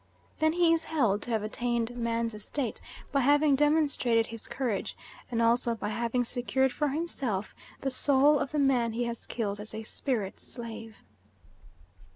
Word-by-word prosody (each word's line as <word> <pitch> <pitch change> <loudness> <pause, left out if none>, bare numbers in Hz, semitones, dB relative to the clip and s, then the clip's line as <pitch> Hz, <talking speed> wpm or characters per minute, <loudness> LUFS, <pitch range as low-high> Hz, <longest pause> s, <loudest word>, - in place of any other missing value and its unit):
Then 315 0 +3
he 340 -1 +4
is 330 0 0
held 235 -10 +1
to - - -7
have 220 -3 0
attained 235 +2 -1
man's 230 -1 -1
estate 225 +4 -4 0.3
by 280 - +2
having 290 +2 +4
demonstrated 280 -6 +3
his 230 -1 -8
courage 240 -7 -2 0.3
and 230 -1 +1
also 235 0 +2
by 210 -2 -4
having 235 +3 0
secured 255 +2 +1
for 295 +3 0
himself 270 - -2 0.3
the 270 - -1
soul 280 +2 +4
of - - -2
the 305 - -2
man 255 -5 +2
he 240 +2 -1
has 235 -1 -5
killed 205 -4 -2
as 215 +1 -8
a 220 - -5
spirit 220 -4 -3
slave. 225 -2 -9
240 Hz, 165 wpm, -29 LUFS, 225-280 Hz, 0.3 s, he